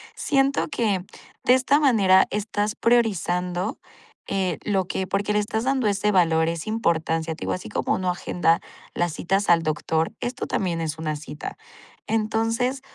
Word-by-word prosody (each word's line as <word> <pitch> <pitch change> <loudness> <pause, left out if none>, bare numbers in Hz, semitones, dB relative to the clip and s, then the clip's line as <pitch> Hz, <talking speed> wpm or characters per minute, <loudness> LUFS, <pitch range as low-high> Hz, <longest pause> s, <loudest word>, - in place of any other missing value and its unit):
Siento 275 -1 +1
que 205 - -1 0.4
de 250 - +5
esta 265 +3 +3
manera 200 -9 +5
estás 210 0 -2
priorizando, 185 -5 +1 0.5
eh, 185 -4 -1
lo 195 -3 0
que 190 +1 -2
porque 200 +2 0
le 210 - +3
estás 220 +3 -2
dando 265 -3 +1
ese 205 +1 +1
valor, 165 -3 +3
esa 170 +4 -3
importancia, 165 -6 0
te - - -18
digo, - - -2
así 185 - -4
como - - -1
uno 185 -1 -1
agenda 175 -1 +1 0.3
las 175 -1 0
citas 195 +4 0
al 165 -1 +5
doctor, 160 +1 0
esto 245 +1 -3
también 175 -4 -1
es 160 -1 -3
una 155 -1 -2
cita. 150 0 -8 0.5
Entonces, 225 +4 0
195 Hz, 160 wpm, -24 LUFS, 170-225 Hz, 0.5 s, de